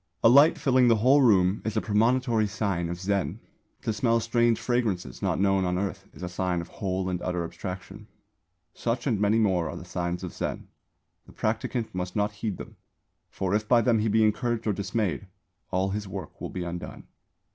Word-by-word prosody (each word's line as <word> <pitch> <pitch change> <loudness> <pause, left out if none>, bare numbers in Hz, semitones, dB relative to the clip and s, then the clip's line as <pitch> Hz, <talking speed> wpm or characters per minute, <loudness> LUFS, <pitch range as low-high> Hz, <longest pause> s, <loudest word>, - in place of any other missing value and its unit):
A - - +8
light 140 +6 +7
filling 130 -2 +3
the 115 - +5
whole 130 +7 +5
room 95 -5 +4
is 110 0 -2
a - - +5
premonitory 115 +1 +2
sign 100 -4 -2
of 85 +1 -4
Zen; 100 0 -1 0.4
to 110 - 0
smell 115 +2 +2
strange 115 0 +2
fragrances 115 -6 -1
not - - 0
known 95 -1 +3
on 90 0 0
earth 100 0 -3
is 80 - -11
a - - -2
sign 90 0 -1
of 85 0 -7
whole 95 -1 -3
and 90 -1 -2
utter 90 -1 -2
Abstraction. 95 +4 -7 0.7
Such 120 +1 -2
and 115 -8 +1
many 105 +2 +3
more 95 -7 +2
are - - -6
the - - -9
signs 90 0 -3
of 90 - -5
Zen. - - -4 0.6
The - - -15
practicant 120 -3 -2
must 90 0 -4
not 105 0 +1
heed 105 -1 -4
them; - - -10 0.5
for 95 0 -2
if 105 +1 0
by 120 0 +5
them 115 0 +3
he 110 - +1
be 110 +1 +3
encouraged 110 +2 0
or 105 - +1
dismayed, 100 -1 -2 0.4
all 95 +1 0
his 105 0 -3
work 95 - -8
will - - -4
be 90 - -4
undone. 85 0 -6
105 Hz, 200 wpm, -27 LUFS, 90-115 Hz, 0.7 s, A